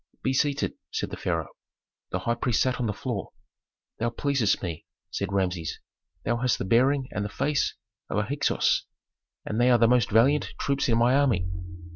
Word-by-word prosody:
"Be 130 - +1
seated," 140 +1 +1 0.2
said - - -3
the - - -3
pharaoh. 80 -4 -2 0.6
The - - -1
high 120 - +1
priest 120 -1 +1
sat 130 -1 0
on 120 - 0
the - - 0
floor. 105 -1 -4 0.7
"Thou 115 - +1
pleasest 120 -4 +1
me," 85 -4 -5 0.2
said - - -3
Rameses. 90 -4 -1 0.5
"Thou 120 - +1
hast 125 -1 +1
the - - -3
bearing 130 +6 +3
and 105 - -2
the 105 - -3
face 140 +6 0 0.3
of - - -1
a 105 - +2
Hyksos, 140 +6 +1 0.6
and 110 +3 -1
they 125 - +5
are 120 - +6
the 115 0 +5
most 125 -2 +3
valiant 130 +8 +3
troops 140 -2 0
in 115 - +3
my 120 +2 +4
army." 130 -10 +3
120 Hz, 185 wpm, -27 LUFS, 105-130 Hz, 0.7 s, are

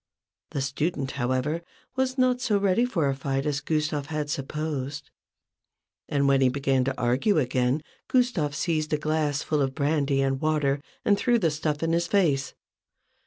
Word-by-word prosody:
The 140 - -3
student, 140 +1 -1
however, 130 +5 -1 0.3
was 260 0 0
not 255 -1 +2
so 225 -5 +2
ready 200 +4 +2
for 175 - 0
a 135 - +1
fight 135 +1 -2
as 145 -1 -1
Gustave 150 -1 -1
had 150 -1 -3
supposed; 145 -1 -4 1.0
and 140 -1 +2
when 135 -1 +4
he 130 - +5
began 135 0 +1
to 135 0 -2
argue 130 - +2
again, 130 +1 +1 0.2
Gustave 220 - +1
seized 155 -3 -1
a - - +3
glass 150 -1 0
full 150 -2 0
of 135 -1 -1
brandy 140 -2 +1
and 135 0 0
water 150 -3 +1 0.2
and 200 -1 +3
threw 240 -2 +3
the 170 -8 +1
stuff 150 0 -2
in 165 0 +1
his 170 0 +1
face. 165 -9 +1
150 Hz, 165 wpm, -26 LUFS, 135-165 Hz, 1.0 s, he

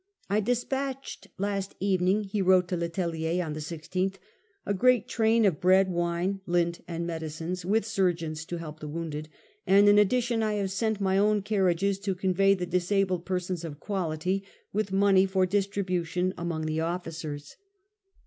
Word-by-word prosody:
' - - -36
I 205 - +3
despatched 265 +4 -2
last 200 0 -2
evening/ 190 +1 +2
he 200 0 -2
wrote 185 -1 +4
to 180 - 0
Le 170 -1 -2
Tellier 170 0 -1
on 155 - -4
the 155 - -5
16th, 175 +5 -3 0.3
* 415 -3 -41
a 205 - 0
great 245 +2 +3
train 225 -1 +3
of 185 -3 +1
bread, 185 +1 +4
wine, 175 +3 -1
lint, 170 -1 0
and 170 0 -3
medicines, 165 +2 -4
with 205 +4 +1
surgeons 170 -7 -1
to 175 - -5
help 155 -2 -8
the 150 - -7
wounded, 155 -1 -5 0.4
and 200 +1 +6
in 205 0 +7
addition 235 +2 +2
I 215 -1 0
have 200 -2 -1
sent 220 +1 -1
my 190 0 +2
own 210 0 +2
carriages 195 -1 +1
to 195 -1 -2
convey 195 +1 +3
the 180 -2 -3
disabled 180 0 0
persons 180 -2 -2
of 150 -3 -7
quality, 185 0 -2 0.3
with 205 -1 -1
money 195 -1 +4
for 190 -1 +2
distribution 185 -2 -1
among 170 -2 -3
the 155 0 -1
officers. 160 -3 -4
185 Hz, 170 wpm, -28 LUFS, 170-200 Hz, 0.4 s, in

